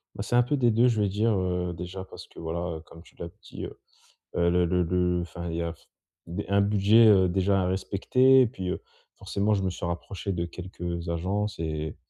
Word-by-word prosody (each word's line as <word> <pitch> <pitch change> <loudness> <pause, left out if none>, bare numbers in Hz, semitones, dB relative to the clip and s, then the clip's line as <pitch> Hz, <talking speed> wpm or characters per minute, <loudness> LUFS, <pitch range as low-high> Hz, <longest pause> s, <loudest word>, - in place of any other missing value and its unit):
Bah 100 - -4
c'est 115 - -1
un 125 - +6
peu 125 +5 0
des 120 -4 +3
2 115 +3 +4
je 115 -3 +1
vais 100 - +2
dire, 110 +4 +1
heu, 90 -1 -1
déjà 90 +2 -7
parce - - -11
que - - -14
voilà, 85 +1 -3
heu, - - -9
comme 80 0 -15
tu - - -21
l'as 85 - -5 0.2
dit, - - -7
heu - - -9 0.6
heu, 85 0 +3
le 90 +1 +3
le 90 +1 +2
le 90 +1 +1
le, - - -1
enfin, 85 0 -6
il 80 - -3
y 85 - -1
a 85 0 -2
f - - -21 0.4
b 90 +5 -3
un 100 0 +3
budget, 105 +3 +5
heu, 95 -3 +5
déjà 95 +2 +2
à - - 0
respecter 125 +8 +3
et - - +3
puis, 95 -6 -5
heu, - - -3 0.4
forcément 105 +2 0
je 100 -2 -1
me 95 - 0
suis 90 - -6
rapproché 85 +3 -4
de 85 -2 -2
quelques 85 -1 -6
agences 95 +5 -2
et 80 -1 -3
90 Hz, 245 wpm, -27 LUFS, 85-105 Hz, 0.6 s, un